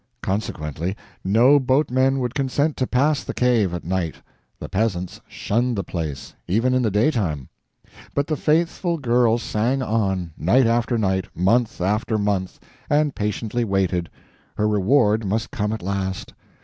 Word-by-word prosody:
Consequently, 90 Hz, -2 st, -3 dB, 0.3 s
no 120 Hz, +9 st, +5 dB
boatmen 130 Hz, 0 st, +2 dB
would 125 Hz, -2 st, -2 dB
consent 140 Hz, +2 st, 0 dB
to 130 Hz, -, 0 dB
pass 140 Hz, +3 st, +2 dB
the -, -, -6 dB
cave 120 Hz, -7 st, +2 dB
at 85 Hz, -, -5 dB
night; 90 Hz, -2 st, -1 dB, 0.4 s
the -, -, -6 dB
peasants 95 Hz, -3 st, -2 dB
shunned 120 Hz, +3 st, -1 dB
the 100 Hz, -, -2 dB
place, 80 Hz, -5 st, -5 dB
even 115 Hz, +8 st, +2 dB
in 130 Hz, -, +2 dB
the 115 Hz, -, +1 dB
daytime. 100 Hz, -, 0 dB, 0.7 s
But 140 Hz, -, +1 dB
the 155 Hz, -, -1 dB
faithful 170 Hz, +3 st, +1 dB
girl 120 Hz, -4 st, +2 dB
sang 120 Hz, +4 st, -1 dB
on, 95 Hz, -7 st, -1 dB
night 120 Hz, +10 st, +4 dB
after 115 Hz, +1 st, +1 dB
night, 95 Hz, -3 st, 0 dB
month 110 Hz, +7 st, +1 dB
after 105 Hz, +4 st, 0 dB
month, 100 Hz, -3 st, -1 dB, 0.3 s
and 145 Hz, -1 st, +2 dB
patiently 105 Hz, +3 st, -2 dB
waited; 95 Hz, -5 st, 0 dB, 0.5 s
her 105 Hz, -, +2 dB
reward 105 Hz, +1 st, +3 dB
must 110 Hz, +3 st, -2 dB
come 105 Hz, +1 st, -1 dB
at 110 Hz, -4 st, -4 dB
last. 95 Hz, -1 st, -3 dB
110 Hz, 150 wpm, -22 LUFS, 95-125 Hz, 0.7 s, no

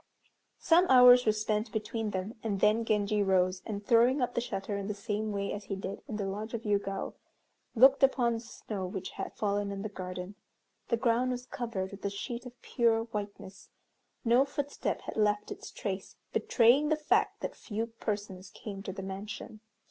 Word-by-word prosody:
Some 350 Hz, +2 st, +4 dB
hours 250 Hz, -1 st, +8 dB
were -, -, +7 dB
spent 215 Hz, +1 st, -1 dB
between 220 Hz, +1 st, -2 dB
them, 195 Hz, +2 st, -3 dB
and 205 Hz, -3 st, -2 dB
then 215 Hz, +3 st, +4 dB
Genji 210 Hz, -1 st, +1 dB
rose, 185 Hz, -1 st, +2 dB
and 205 Hz, -2 st, -5 dB
throwing 240 Hz, +4 st, +5 dB
up 245 Hz, -1 st, 0 dB
the 240 Hz, -, 0 dB
shutter 200 Hz, -3 st, -3 dB
in 200 Hz, -1 st, -3 dB
the 210 Hz, -, -3 dB
same 210 Hz, +1 st, -2 dB
way 200 Hz, -1 st, -2 dB
as 205 Hz, 0 st, -6 dB
he 195 Hz, -, -3 dB
did 190 Hz, 0 st, -5 dB
in 215 Hz, -, -4 dB
the 205 Hz, -2 st, -2 dB
lodge 210 Hz, +4 st, -4 dB
of 230 Hz, -, -5 dB
Yûgao, 200 Hz, -2 st, -1 dB, 0.6 s
looked 265 Hz, +4 st, +7 dB
upon 255 Hz, -3 st, +4 dB
the 225 Hz, -, -2 dB
snow 210 Hz, -4 st, -6 dB
which 190 Hz, 0 st, -5 dB
had -, -, -6 dB
fallen 205 Hz, -1 st, -1 dB
in 195 Hz, 0 st, -5 dB
the 215 Hz, -, -3 dB
garden. 185 Hz, -1 st, -6 dB, 0.5 s
The 235 Hz, -, +1 dB
ground 240 Hz, +1 st, +2 dB
was 250 Hz, 0 st, -3 dB
covered 205 Hz, -8 st, -4 dB
with 200 Hz, -, -11 dB
a 200 Hz, -, 0 dB
sheet 235 Hz, +5 st, -5 dB
of 245 Hz, 0 st, -14 dB
pure 230 Hz, -2 st, +2 dB
whiteness; 205 Hz, -3 st, -7 dB, 0.6 s
no 240 Hz, +3 st, +5 dB
footstep 285 Hz, 0 st, -3 dB
had -, -, -7 dB
left 210 Hz, -1 st, +1 dB
its -, -, -7 dB
trace, 190 Hz, -2 st, -5 dB, 0.2 s
betraying 255 Hz, +5 st, +4 dB
the 315 Hz, -, +4 dB
fact 305 Hz, 0 st, +1 dB
that -, -, -4 dB
few 220 Hz, 0 st, -3 dB
persons 205 Hz, -4 st, -5 dB
came 195 Hz, 0 st, -8 dB
to 195 Hz, -, -5 dB
the 195 Hz, 0 st, -7 dB
mansion. 205 Hz, +3 st, -7 dB
210 Hz, 190 wpm, -30 LUFS, 200-235 Hz, 0.6 s, hours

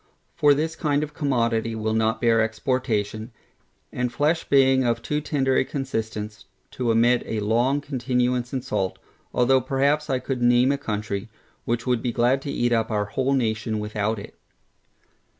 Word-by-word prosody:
For 145 Hz, -1 st, +4 dB
this 160 Hz, +2 st, -2 dB
kind 145 Hz, -1 st, 0 dB
of 150 Hz, 0 st, -6 dB
commodity 115 Hz, -6 st, 0 dB
will 110 Hz, 0 st, -1 dB
not 110 Hz, +1 st, +1 dB
bear 115 Hz, -2 st, +3 dB
exportation, 110 Hz, -1 st, -1 dB, 0.6 s
and 125 Hz, -1 st, -1 dB
flesh 155 Hz, +6 st, 0 dB
being 135 Hz, -1 st, +4 dB
of 120 Hz, -1 st, +1 dB
too 150 Hz, 0 st, -1 dB
tender 135 Hz, -3 st, 0 dB
a -, -, +4 dB
consistence, 110 Hz, -6 st, -4 dB, 0.3 s
to 125 Hz, -2 st, -2 dB
admit 120 Hz, +2 st, +4 dB
a 110 Hz, -, -2 dB
long 120 Hz, +7 st, +1 dB
continuance 125 Hz, -3 st, -1 dB
in 130 Hz, -2 st, -3 dB
salt, 95 Hz, -8 st, -2 dB, 0.3 s
although 130 Hz, +2 st, +3 dB
perhaps 140 Hz, +4 st, +1 dB
I 130 Hz, -, +2 dB
could 130 Hz, 0 st, -4 dB
name 120 Hz, +2 st, +4 dB
a 140 Hz, -, 0 dB
country, 105 Hz, -3 st, -4 dB, 0.4 s
which 120 Hz, 0 st, -1 dB
would 125 Hz, -3 st, +1 dB
be 120 Hz, -, -1 dB
glad 125 Hz, +3 st, +2 dB
to 140 Hz, -, -4 dB
eat 120 Hz, 0 st, 0 dB
up 115 Hz, -1 st, +1 dB
our 105 Hz, -2 st, 0 dB
whole 130 Hz, +6 st, -1 dB
nation 110 Hz, -3 st, -1 dB
without 105 Hz, +1 st, -2 dB
it. 100 Hz, -, -9 dB
120 Hz, 170 wpm, -24 LUFS, 110-135 Hz, 0.6 s, For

